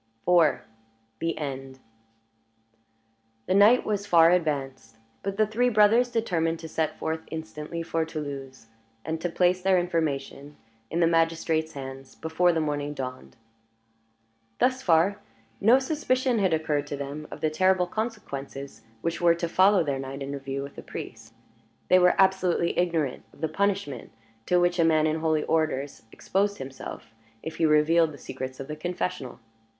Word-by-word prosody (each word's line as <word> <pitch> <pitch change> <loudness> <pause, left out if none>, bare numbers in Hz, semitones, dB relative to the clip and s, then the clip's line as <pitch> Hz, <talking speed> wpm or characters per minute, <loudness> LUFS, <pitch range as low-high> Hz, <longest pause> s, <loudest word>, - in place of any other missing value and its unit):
IV. 170 -4 +4 0.6
THE 165 0 -2
END 135 -3 -5 1.7
The - - 0
night 210 +6 +6
was 205 -1 -2
far 170 -3 +6
advanced; 135 -9 -1 0.2
but 195 0 -4
the 215 - +4
three 235 +4 +1
brothers 225 +3 +4
determined 170 -8 0
to 165 - -7
set 155 -1 -2
forth 160 0 -3
instantly 160 +1 -6
for 165 -1 -1
Toulouse, 140 -6 -7 0.4
and 160 0 -3
to 175 - -1
place 180 +2 +2
their 190 0 +3
information 150 -4 -2 0.3
in 170 +3 -1
the - - +5
magistrate's 165 -1 +1
hands 135 -1 -8
before 160 +2 +1
the 165 - 0
morning 145 -1 -2
dawned. 130 - -7 1.2
Thus 260 0 +2
far 180 +1 +3 0.4
no 230 +5 +6
suspicion 260 -4 0
had 190 -3 +2
occurred 150 -2 0
to 145 - -4
them 140 +2 -6
of - - -9
the 155 - +1
terrible 185 +3 +3
consequences 140 - -6 0.2
which 170 0 -2
were 170 -1 +5
to 170 0 -2
follow 190 +2 +4
their 140 -3 -2
night 135 +1 -6
interview 135 0 -4
with 140 - -10
the - - -6
priest. 115 0 -9 0.6
They 185 - +6
were 180 0 +5
absolutely 190 -3 +2
ignorant 165 -6 0
of - - -20
the 160 - +1
punishment 195 - -2 0.4
to 180 - +3
which 175 0 +1
a - - +5
man 155 -1 +3
in 155 +1 0
holy 155 -1 +1
orders 150 -4 -1
exposed 200 +1 -1
himself, 135 -3 -8 0.3
if 160 - -6
he 165 - +3
revealed 155 +2 +4
the - - -10
secrets 130 -1 -7
of 135 - -6
the 150 - -5
confessional. 175 -4 -4
160 Hz, 155 wpm, -26 LUFS, 145-180 Hz, 1.7 s, night